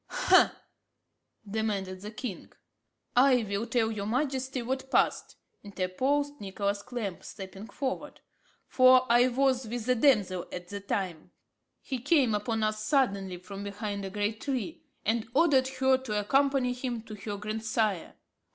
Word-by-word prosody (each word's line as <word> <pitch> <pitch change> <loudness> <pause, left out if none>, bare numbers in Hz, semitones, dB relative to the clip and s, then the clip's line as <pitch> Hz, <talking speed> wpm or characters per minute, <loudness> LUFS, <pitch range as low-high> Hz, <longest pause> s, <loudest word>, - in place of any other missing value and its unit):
ha!" - - +4 0.9
demanded 200 -3 -2
the 210 - -6
king. 215 -2 -7 0.6
"I 250 -1 +5
will 200 +3 -2
tell 225 -2 +1
your 205 -2 -4
majesty 260 +1 -1
what 265 +2 -3
passed," - - +1 0.3
interposed 265 +10 -1
Nicholas 200 0 -2
Clamp, 215 -6 -5
stepping 195 +1 -9
forward, 260 +1 -4 0.5
"for 255 0 +6
I 240 +1 +6
was 260 -1 +1
with 235 0 -4
the 250 - +3
damsel 210 -9 +2
at 180 0 -7
the 205 - -5
time. 185 -4 -3 0.5
He 260 -3 -3
came 270 -3 +3
upon 220 +2 -1
us 215 0 -1
suddenly 200 -9 +1
from 195 +3 -8
behind 205 0 -4
a 195 - -4
great 210 +2 -2
tree, 280 +5 -3 0.2
and 225 +1 0
ordered 280 -5 +4
her 265 0 +2
to 215 -5 -2
accompany 270 +3 +2
him 245 -2 -4
to 220 - -10
her 205 0 -5
grandsire." 215 -2 -1
225 Hz, 140 wpm, -29 LUFS, 200-260 Hz, 0.9 s, for